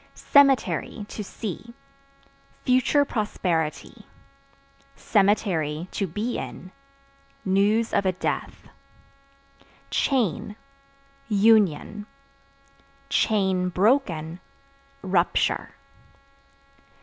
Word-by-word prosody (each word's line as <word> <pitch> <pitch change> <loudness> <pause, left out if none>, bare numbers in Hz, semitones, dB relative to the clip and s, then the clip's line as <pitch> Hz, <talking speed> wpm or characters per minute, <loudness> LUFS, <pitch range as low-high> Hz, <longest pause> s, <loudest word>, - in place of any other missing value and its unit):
Cemetery 275 -6 +2
(To 210 - -6
see) 225 +4 -7 0.9
future 260 +3 +3
prosperity; 180 - -3 0.9
(to 190 -4 0
be 220 +7 -2
in) 185 - -8 0.7
news 205 +4 +2
of 200 - +2
a - - +3
death. 180 - -4 1.2
Chain 220 - 0 0.7
Union; 210 -1 +2 1.7
(broken) 180 - +1 0.6
rupture. 185 -2 +1
205 Hz, 55 wpm, -24 LUFS, 180-230 Hz, 1.7 s, future